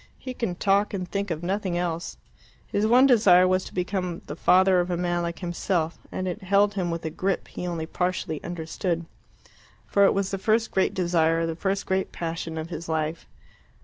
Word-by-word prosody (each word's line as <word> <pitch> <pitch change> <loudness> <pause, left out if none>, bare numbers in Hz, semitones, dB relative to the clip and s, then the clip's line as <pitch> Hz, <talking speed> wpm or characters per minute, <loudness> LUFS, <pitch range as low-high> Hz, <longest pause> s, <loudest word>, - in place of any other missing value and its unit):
He 255 - -6
could 205 -8 -3
talk 200 +1 +2
and 185 -2 -4
think 200 +2 -3
of 165 -1 -3
nothing 190 -1 -1
else. 170 -1 -3 0.5
His 210 +2 0
one 250 +4 +6
desire 200 -8 +6
was 185 0 +2
to - - -9
become 180 -1 -2
the 150 - -6
father 185 +2 +4
of 175 0 0
a 175 - -1
man 175 0 0
like 170 -1 -3
himself, 175 -2 -2
and 185 - -3
it 185 +4 -4
held 200 +2 +3
him 185 -3 -1
with 165 -1 -4
a 160 - -2
grip 185 +3 -1
he 180 - -5
only 165 -2 -3
partially 180 -2 -2
understood, 170 0 -3 0.8
for 200 - +3
it - - +3
was 195 -1 0
the 195 - -2
first 220 +3 +1
great 190 - +1
desire, 165 -2 +2
the 165 -1 -3
first 195 +3 -1
great 190 0 -1
passion 165 -1 -4
of 160 +1 -4
his 165 0 -6
life. 160 +1 -2
180 Hz, 200 wpm, -25 LUFS, 170-195 Hz, 0.8 s, one